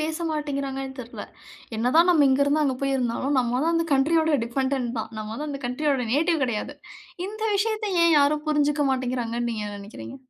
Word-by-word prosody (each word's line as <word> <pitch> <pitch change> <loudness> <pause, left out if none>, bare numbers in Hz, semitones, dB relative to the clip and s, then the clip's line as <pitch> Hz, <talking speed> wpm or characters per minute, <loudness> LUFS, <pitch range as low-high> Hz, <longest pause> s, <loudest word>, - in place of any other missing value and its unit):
பேசமாட்டேன்கிறாங்கனு 290 -4 -3
தெரில? 235 -1 -8 0.5
என்ன 240 +3 0
தான் 345 +2 +6
நம்ம 305 -5 +5
இங்க 265 +2 +3
இருந்து, 295 +2 +2
அங்க 265 -2 0
போய் 275 0 +1
இருந்தாலும் 260 +3 -1
நம்ம 245 +1 0
வந்து 335 - +2
அந்த 320 0 +2
டிஃபெண்டென்ட் 260 0 -1
தான். 220 - -4
நம்ம 215 0 -5
வந்து 300 +5 -5
அந்த 280 -1 -5
கண்ட்ரியோட 275 +2 0
நேட்டிவ் 320 +1 +2
கெடையாது. 245 +4 -3 0.5
இந்த 430 +2 -7
விஷயத்தை 430 0 -1
ஏன் 335 -2 +5
யாரும் 295 +1 +2
புரிஞ்சுக்கமாட்டிங்கிறாங்கன்னு 260 -5 0
நீங்க 215 -2 -3
என்ன 205 0 -6
நெனைக்கிறீங்க? 205 +6 -9
280 Hz, 170 wpm, -25 LUFS, 250-310 Hz, 0.5 s, தான்